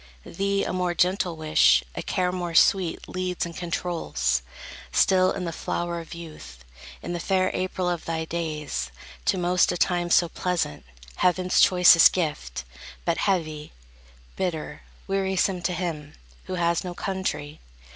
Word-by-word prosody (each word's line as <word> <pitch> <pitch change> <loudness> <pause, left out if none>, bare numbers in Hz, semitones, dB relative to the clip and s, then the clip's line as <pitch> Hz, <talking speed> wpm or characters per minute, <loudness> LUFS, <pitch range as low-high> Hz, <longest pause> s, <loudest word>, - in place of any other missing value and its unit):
Thee 200 +2 -1
a - - -3
more 180 -1 -1
gentle 180 -1 +1
wish, 155 - +4
a - - -4
care 180 -1 -1
more 175 -2 -4
sweet 180 -1 +3
Leads 185 -1 -2
and 170 -1 -8
controls, 170 - -1 0.5
still 185 -1 +4
in 190 -2 -4
the 170 - -3
flower 170 +1 -3
of 165 0 -9
youth, 65 - -11 0.4
In - - -4
the 175 - -3
fair 185 +1 +1
April 185 0 -2
of 175 -2 -2
thy 160 -1 -2
days, 155 - -3 0.4
to - - +2
most 180 0 +2
A - - -2
time 175 0 +1
so 170 0 +4
pleasant, 170 - -2 0.3
heaven's 180 0 +2
choicest 180 -2 +7
gift; 150 - -3 0.4
But - - 0
heavy, 155 -6 -1 0.6
bitter, 160 -5 -3 0.3
wearisome 190 -1 0
to 175 +1 -1
him 160 -4 -4 0.3
Who 185 - -4
has 170 -1 +1
no 180 -1 -6
country. 155 -7 -3
175 Hz, 145 wpm, -25 LUFS, 160-185 Hz, 0.6 s, choicest